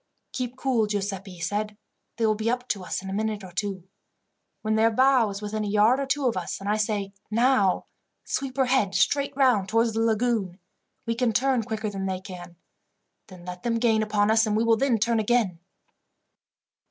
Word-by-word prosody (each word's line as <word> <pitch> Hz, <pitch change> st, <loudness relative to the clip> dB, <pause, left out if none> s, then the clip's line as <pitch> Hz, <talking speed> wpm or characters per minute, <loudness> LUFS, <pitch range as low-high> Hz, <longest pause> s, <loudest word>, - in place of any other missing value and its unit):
"Keep 250 Hz, -1 st, -4 dB
cool, 255 Hz, -5 st, +1 dB
Giuseppi," 195 Hz, -2 st, -3 dB
he 175 Hz, -, -13 dB
said. 205 Hz, +4 st, -3 dB, 0.4 s
"They 230 Hz, -, +1 dB
will 215 Hz, -, +3 dB
be 220 Hz, +2 st, -2 dB
up 245 Hz, +1 st, -2 dB
to 195 Hz, -3 st, -2 dB
us 180 Hz, -, -4 dB
in 190 Hz, -, -6 dB
a -, -, -4 dB
minute 215 Hz, 0 st, -2 dB
or 185 Hz, -, -10 dB
two. 195 Hz, 0 st, -3 dB, 0.8 s
When 215 Hz, 0 st, 0 dB
their 220 Hz, +1 st, +4 dB
bow 255 Hz, -1 st, +4 dB
is 200 Hz, +1 st, -6 dB
within 215 Hz, +1 st, -3 dB
a -, -, -2 dB
yard 215 Hz, +5 st, +4 dB
or 275 Hz, -, -2 dB
two 280 Hz, 0 st, 0 dB
of 240 Hz, -, +1 dB
us, -, -, -4 dB
and 195 Hz, -, -7 dB
I 210 Hz, -, +2 dB
say, 205 Hz, -2 st, -2 dB, 0.2 s
'Now!' 225 Hz, -4 st, +2 dB, 0.4 s
sweep 270 Hz, -1 st, -3 dB
her 265 Hz, -, +3 dB
head 250 Hz, -7 st, +1 dB
straight 280 Hz, +8 st, +1 dB
round 245 Hz, -8 st, +3 dB
towards 225 Hz, +1 st, +2 dB
the 225 Hz, -, -1 dB
lagoon. 225 Hz, -5 st, 0 dB, 0.5 s
We 230 Hz, -, 0 dB
can 235 Hz, -1 st, 0 dB
turn 260 Hz, +1 st, +2 dB
quicker 215 Hz, -1 st, -4 dB
than 195 Hz, -1 st, -4 dB
they 185 Hz, -1 st, -2 dB
can. 180 Hz, -2 st, -10 dB, 0.7 s
Then 180 Hz, -3 st, -13 dB
let 180 Hz, 0 st, -7 dB
them 230 Hz, +1 st, 0 dB
gain 225 Hz, -2 st, +2 dB
upon 210 Hz, 0 st, +1 dB
us, 220 Hz, 0 st, +4 dB
and 210 Hz, 0 st, +1 dB
we 225 Hz, -, +2 dB
will 230 Hz, -1 st, +4 dB
then 250 Hz, 0 st, +2 dB
turn 230 Hz, +2 st, +1 dB
again." 215 Hz, -6 st, +1 dB
215 Hz, 205 wpm, -25 LUFS, 200-240 Hz, 0.8 s, their